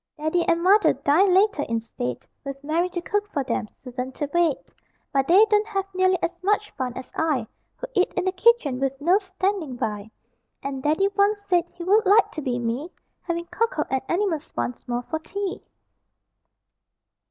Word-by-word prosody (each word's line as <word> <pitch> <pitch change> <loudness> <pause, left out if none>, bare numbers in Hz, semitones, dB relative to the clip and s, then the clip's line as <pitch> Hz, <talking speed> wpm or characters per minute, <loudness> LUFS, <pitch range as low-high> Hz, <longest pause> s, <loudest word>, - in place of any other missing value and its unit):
Daddy 315 +3 +1
and 335 0 +2
Mother 405 +3 +5
dine 365 +7 +3
later 390 -3 +3
in 230 -5 -1
state, 125 - -5 0.2
With 275 0 -7
Mary 330 +5 0
to 350 -1 -4
cook 415 +2 -1
for 280 - -1
them, 235 -3 -2 0.2
Susan 250 0 -5
to 290 - -3
wait; 340 -5 +3 0.6
But 270 -1 +2
they 385 +6 +7
don't 425 0 +2
have 390 -3 -1
nearly 370 0 +3
as 340 - 0
much 420 +2 +1
fun 250 -2 -4
as 260 - -8
I 300 -8 0 0.3
Who - - -6
eat 370 -4 +2
in 365 - 0
the 375 - +2
kitchen 370 - +3
with 270 0 -1
Nurse 365 +7 +2
standing 375 -8 -2
by; 210 -3 -3 0.5
And 275 -1 -4
Daddy 310 +8 +2
once 405 +1 +1
said, 355 -3 +2
he 345 - -7
would 410 +4 +3
like 410 +3 +5
to 310 - -5
be 250 -3 -1
me 240 +7 -2 0.3
Having 340 -1 -3
cocoa 460 +2 0
and 265 -1 +1
animals 345 -4 -1
once 120 +1 -4
more 245 0 -2
for 315 +5 -3
tea! 390 +4 -4
340 Hz, 185 wpm, -24 LUFS, 265-390 Hz, 0.6 s, they